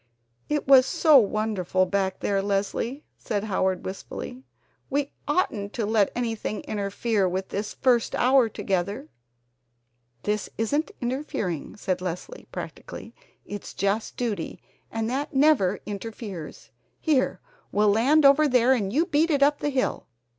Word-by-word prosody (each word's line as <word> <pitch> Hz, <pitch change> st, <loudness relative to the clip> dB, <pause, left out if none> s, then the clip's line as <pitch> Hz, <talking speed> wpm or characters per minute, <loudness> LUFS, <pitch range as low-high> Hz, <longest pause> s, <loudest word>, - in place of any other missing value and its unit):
"It 295 Hz, -2 st, -1 dB
was 265 Hz, -1 st, +7 dB
so 305 Hz, -2 st, +6 dB
wonderful 205 Hz, -4 st, 0 dB
back 190 Hz, 0 st, -1 dB
there, 195 Hz, -1 st, +1 dB
Leslie," 205 Hz, +7 st, -2 dB
said 205 Hz, -2 st, -2 dB
Howard 190 Hz, -3 st, 0 dB
wistfully. 220 Hz, +6 st, -7 dB, 0.5 s
"We 285 Hz, +1 st, -1 dB, 0.2 s
oughtn't 230 Hz, -, 0 dB
to 230 Hz, -, -1 dB
let 210 Hz, -2 st, +2 dB
anything 225 Hz, -3 st, -2 dB
interfere 205 Hz, -1 st, -1 dB
with 190 Hz, +1 st, -3 dB
this 205 Hz, +1 st, -4 dB
first 245 Hz, -3 st, +2 dB
hour 255 Hz, -1 st, +4 dB
together." 200 Hz, -, -2 dB, 1.1 s
"This 210 Hz, 0 st, -1 dB
isn't 285 Hz, -, 0 dB
interfering," 240 Hz, -, -3 dB
said 185 Hz, -3 st, -2 dB
Leslie 180 Hz, -, -6 dB
practically, -, -, -8 dB, 0.3 s
"it's 205 Hz, -1 st, -7 dB
just 200 Hz, +3 st, -1 dB
duty, 215 Hz, -9 st, -3 dB, 0.3 s
and 225 Hz, 0 st, -2 dB
that 275 Hz, +4 st, -3 dB
never 265 Hz, -10 st, +4 dB
interferes. 205 Hz, -5 st, -7 dB, 0.3 s
Here, 290 Hz, -5 st, +1 dB, 0.3 s
we'll 210 Hz, 0 st, +3 dB
land 275 Hz, +8 st, +4 dB
over 285 Hz, +2 st, +6 dB
there 250 Hz, -1 st, +4 dB
and 205 Hz, -6 st, -1 dB
you 310 Hz, +9 st, +2 dB
beat 315 Hz, +1 st, +2 dB
it 285 Hz, -3 st, +3 dB
up 290 Hz, +1 st, +3 dB
the 290 Hz, -, -1 dB
hill! 265 Hz, -2 st, -1 dB
220 Hz, 135 wpm, -25 LUFS, 200-270 Hz, 1.1 s, was